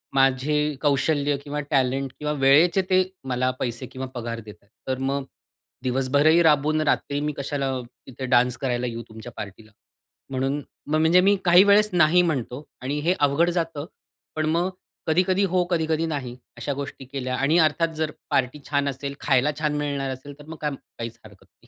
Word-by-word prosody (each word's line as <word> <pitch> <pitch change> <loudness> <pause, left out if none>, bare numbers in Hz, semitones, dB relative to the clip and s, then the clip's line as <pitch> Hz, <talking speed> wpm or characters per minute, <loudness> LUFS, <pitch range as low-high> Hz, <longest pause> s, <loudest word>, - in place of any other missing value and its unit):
माझे 135 +2 +3 0.3
कौशल्य 145 0 +2
किंवा 145 +1 -4
टॅलेंट 135 -1 +1
किंवा 150 0 -1
वेळेचे 160 +8 +5
ते 185 0 +5 0.3
मला 130 0 +1
पैसे 120 0 -3
किंवा 130 +1 -6
पगार 115 -1 -4
देत 105 -2 -11
आहेत. 100 - -32 0.2
तर 130 0 -1
मग 135 +1 -1 0.6
दिवसभरही 140 +6 +3
राबवून 155 0 +3
रात्री 145 -1 0
मी 150 0 -1
कशाला 140 -1 -2 0.4
इथे 130 0 -6
डान्स 125 -1 +3
करायला 125 -2 -1
येऊ 115 -1 -5
तुमच्या 110 +2 -10
पार्टीला. 105 +2 -8 0.6
म्हणून 135 +2 -1 0.3
मग, 155 +1 +1
म्हणजे 165 +3 +5
मी 200 +2 +4
काही 175 +1 +8
वेळेस 205 +1 +5
नाही 175 +1 +5
म्हणतो 145 -4 -2 0.2
आणि 140 +3 -2
हे 170 +4 +2
अवघड 145 +4 +3
जातं. 165 -4 -2 0.5
पण 155 -1 0
मग 170 +3 +1 0.4
कधी-कधी 185 +4 +2
हो, 185 -1 +2
कधी-कधी 160 -1 +1
नाही, 135 -6 -4 0.2
अशा 120 +4 -3
गोष्टी 140 -1 -7
केल्या 130 -1 -3
आणि 145 +5 +2
अर्थात 160 +1 +3
जर 155 -1 -1 0.2
पार्टी 130 +2 0
छान 145 -1 +1
असेल, 140 +1 -5
खायला 135 +1 +3
छान 150 -1 0
मिळणार 140 -2 -2
असेल 130 +3 -10
तर 145 - -12
मग 160 0 -8
काय? 150 -1 -1 0.3
काहीच 115 0 -6
हरकत 100 -3 -16
नाही. - - -28
140 Hz, 175 wpm, -24 LUFS, 130-155 Hz, 0.6 s, काही